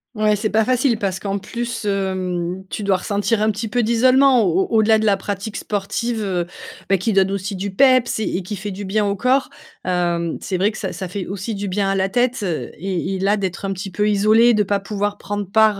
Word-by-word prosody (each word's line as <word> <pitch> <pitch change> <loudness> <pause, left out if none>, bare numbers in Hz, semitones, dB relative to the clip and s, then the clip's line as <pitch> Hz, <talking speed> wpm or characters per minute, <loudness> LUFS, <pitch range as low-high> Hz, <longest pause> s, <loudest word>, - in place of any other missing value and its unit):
Ouais, 215 -1 +2
c'est 215 +1 -2
pas 220 +2 +3
facile 250 -1 +1
parce 190 -2 -2
qu'en 200 0 -2
plus, 235 +3 -5
hem, 185 -2 -2
tu 210 - -4
dois 195 -2 +2
ressentir 205 +3 0
un 215 - +3
petit 215 +2 -2
peu 240 +3 0
d'isolement. 255 +2 +4
Au 185 0 +2
au - - -9
au-delà 220 0 +4
de 220 - -1
la 200 -1 +3
pratique 200 +2 -5
sportive, 220 +3 -2
heu, 180 -3 -1 0.4
beh, 195 +1 +2
qui 210 +4 0
donne 195 0 +3
aussi 200 +1 -3
du 195 +2 -4
peps 255 0 +4
et 215 - -1
et 190 - -4
qui 205 +4 -5
fait 200 +2 -5
du 200 +1 -6
bien 210 +3 +1
au 200 - 0
corps, 255 +6 +1 0.4
hem, 175 -2 0
c'est 185 - -3
vrai 200 +3 +3
que 215 - -9
ça - - -4
ça 190 - -5
fait 185 +1 -5
aussi 200 +3 -4
du 200 0 -4
bien 195 +1 0
à 195 - +1
la 190 0 +1
tête, 245 +2 +1
heu, 175 -5 -2
et 190 +2 -2
et - - -4
là 200 +2 +2
d'être 190 -1 -3
un 195 - -1
petit 195 +1 -6
peu 205 +3 0
isolé, 215 +3 +4
de 210 - +2
pas 200 0 +1
pouvoir 205 +1 -3
prendre 205 -1 -4
part, 215 -1 +4
200 Hz, 245 wpm, -20 LUFS, 190-220 Hz, 0.4 s, d'isolement